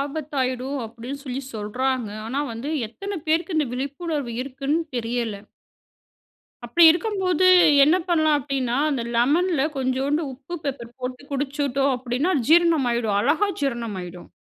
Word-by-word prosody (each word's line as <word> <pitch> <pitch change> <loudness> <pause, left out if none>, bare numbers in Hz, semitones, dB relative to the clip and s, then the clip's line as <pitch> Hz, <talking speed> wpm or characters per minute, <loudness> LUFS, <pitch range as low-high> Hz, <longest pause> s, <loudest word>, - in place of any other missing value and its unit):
ஆபத்தாயிடும் 275 -2 -2
அப்படின்னு 235 +5 -8
சொல்லி 265 +1 -4
சொல்றாங்க. 245 +3 -2 0.2
ஆனா, 265 +5 -2
வந்து 230 +6 -6 0.2
எத்தனை 395 - -6
பேருக்கு 325 +1 +1
இந்த 300 -3 +2
விழிப்புணர்வு 280 0 -3
இருக்குன்னு 275 +4 -2 0.2
தெரியல. 230 -2 -2 1.3
அப்டி 335 +9 +2
இருக்கும்போது 370 0 +2 0.4
என்ன 320 +5 +4
பண்ணலாம் 310 -3 +3
அப்டின்னா, 265 -3 -2
அந்த 265 -4 -1
லெமன்ல 295 +6 +2
கொஞ்சோண்டு 270 +4 0
உப்பு 280 +7 -9
பெப்பர் 240 -4 -5
போட்டு 255 +1 -5
குடிச்சுட்டோம் 275 -1 0
அப்டின்னா, 255 +8 -1 0.2
ஜீரணம் 330 -5 +5
ஆயிடும், 225 -4 0
அழகா 310 - +2
ஜீரணம் 235 -6 -2
ஆயிடும். 175 0 -10
275 Hz, 125 wpm, -23 LUFS, 245-310 Hz, 1.3 s, ஜீரணம்